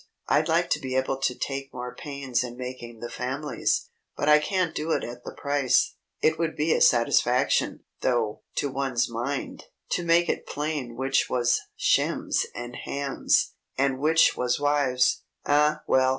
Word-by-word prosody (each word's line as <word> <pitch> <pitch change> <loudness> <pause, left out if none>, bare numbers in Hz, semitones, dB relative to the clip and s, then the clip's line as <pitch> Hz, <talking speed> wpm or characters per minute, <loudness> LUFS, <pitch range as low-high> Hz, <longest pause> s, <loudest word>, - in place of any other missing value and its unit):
I'd - - +3
like - - +1
to - - +2
be 130 -1 -4
able 130 0 0
to 130 -2 0
take 135 0 -4
more 125 0 -6
pains 140 -5 -2
in 120 -1 -7
making 125 -2 -7
the 120 - -5
families, 130 +1 -2 0.3
but 145 - -1
I 150 0 +7
can't 180 +1 0
do 160 +1 -2
it - - 0
at 120 +1 -7
the - - -7
price. 140 -3 +2 0.3
It 160 0 +3
would 165 -1 -1
be 155 +2 +2
a - - 0
satisfaction, 125 +2 +3 0.2
though, 120 -4 0
to 140 - -1
one's 130 -2 0
mind, 120 +4 -4 0.3
to 175 - 0
make 170 +1 +4
it - - -2
plain 145 -5 -3
which 135 +2 +1
was 120 -1 +2
Shems - - +1
and 120 0 -6
Hams, 140 -1 0 0.2
and 135 -1 +1
which 160 +3 +4
was 125 +1 0
wives. 145 -3 +2 0.2
Ah, 150 +1 +3
well! 130 0 +3
135 Hz, 165 wpm, -26 LUFS, 125-150 Hz, 0.3 s, I